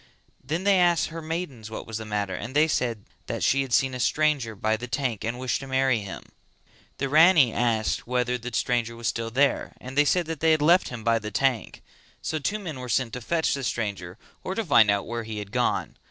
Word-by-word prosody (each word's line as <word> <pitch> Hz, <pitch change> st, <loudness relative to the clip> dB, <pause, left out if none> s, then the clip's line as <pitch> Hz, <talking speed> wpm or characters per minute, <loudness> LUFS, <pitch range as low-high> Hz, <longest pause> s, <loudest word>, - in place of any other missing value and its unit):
Then 160 Hz, +7 st, -3 dB
they 200 Hz, -1 st, +4 dB
asked 175 Hz, -1 st, +3 dB
her 165 Hz, +1 st, -7 dB
maidens 155 Hz, -9 st, -5 dB
what 110 Hz, -, -7 dB
was 110 Hz, -1 st, -5 dB
the 110 Hz, -, -7 dB
matter 105 Hz, -2 st, -2 dB
and 120 Hz, +7 st, -6 dB
they 155 Hz, +2 st, +5 dB
said 120 Hz, -7 st, -1 dB, 0.2 s
that -, -, -3 dB
she 135 Hz, -, +3 dB
had 135 Hz, -2 st, -5 dB
seen 135 Hz, +1 st, +2 dB
a 125 Hz, -, -5 dB
stranger 140 Hz, -4 st, +1 dB
by 110 Hz, +2 st, 0 dB
the 120 Hz, +3 st, -6 dB
tank 125 Hz, -4 st, -2 dB
and 115 Hz, +2 st, -3 dB
wished 130 Hz, -1 st, -1 dB
to 135 Hz, -, -8 dB
marry 130 Hz, -2 st, +2 dB
him. 100 Hz, -2 st, -7 dB, 0.7 s
The 140 Hz, -, -1 dB
Rani 155 Hz, -3 st, +6 dB
asked 115 Hz, -3 st, 0 dB
whether 125 Hz, 0 st, 0 dB
the 125 Hz, +1 st, -6 dB
stranger 115 Hz, 0 st, 0 dB
was 115 Hz, 0 st, -4 dB
still 115 Hz, 0 st, -2 dB
there 135 Hz, +3 st, +1 dB
and 130 Hz, +1 st, -9 dB
they 145 Hz, +1 st, +4 dB
said 175 Hz, +4 st, +2 dB
that 160 Hz, -1 st, -5 dB
they 160 Hz, 0 st, +4 dB
had 155 Hz, -, +1 dB
left 175 Hz, +4 st, +4 dB
him 120 Hz, -3 st, -7 dB
by 115 Hz, 0 st, +2 dB
the 105 Hz, -1 st, -6 dB
tank. 125 Hz, +1 st, -1 dB, 0.4 s
So 155 Hz, -, -2 dB
two 200 Hz, +9 st, -1 dB
men 165 Hz, -10 st, -6 dB
were 125 Hz, -1 st, -7 dB
sent 120 Hz, 0 st, 0 dB
to 125 Hz, -, -5 dB
fetch 160 Hz, +6 st, 0 dB
the 140 Hz, -, -3 dB
stranger 100 Hz, -6 st, -3 dB, 0.3 s
or 190 Hz, -, -4 dB
to 225 Hz, -, -2 dB
find 115 Hz, -, +5 dB
out 100 Hz, 0 st, +1 dB
where 115 Hz, 0 st, -4 dB
he 110 Hz, -1 st, -6 dB
had 105 Hz, -1 st, -6 dB
gone. -, -, 0 dB
125 Hz, 235 wpm, -25 LUFS, 115-150 Hz, 0.7 s, Rani